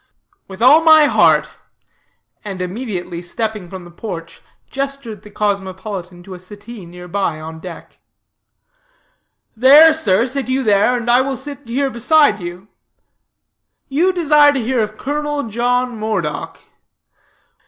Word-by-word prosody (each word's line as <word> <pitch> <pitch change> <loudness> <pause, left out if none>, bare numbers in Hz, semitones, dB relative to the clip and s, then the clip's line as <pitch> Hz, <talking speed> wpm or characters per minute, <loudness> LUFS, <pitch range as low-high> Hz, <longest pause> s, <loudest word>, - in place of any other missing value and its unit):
"With 195 +3 -6
all 290 +6 +7
my 315 -2 +6
heart," - - +3 1.0
and 195 -3 -6
immediately 180 -3 -5
stepping 210 +1 -4
from 185 -1 -9
the 175 - -13
porch, 170 -3 -8 0.3
gestured 275 -6 -5
the 210 - -14
cosmopolitan 190 -3 -4
to 190 +1 -10
a 180 - -10
settee 205 +1 -11
near 180 +1 -11
by, 175 -4 -2
on 160 +1 -9
deck. 175 -1 -11 1.6
"There, 290 +7 +7
sir, 225 -8 +1
sit 260 0 -4
you 265 +1 0
there, 210 +3 +3
and 240 -1 -6
I 245 +2 +4
will 265 0 -3
sit 280 -1 -9
here 270 +3 -1
beside 250 -1 +3
you 175 +2 -8 1.2
you 330 +7 +2
desire 300 -5 +4
to 275 - -1
hear 250 +2 -1
of 215 0 -4
Colonel 295 +1 -3
John 245 +2 -1
Moredock. 185 -10 -3
220 Hz, 135 wpm, -17 LUFS, 185-270 Hz, 1.6 s, all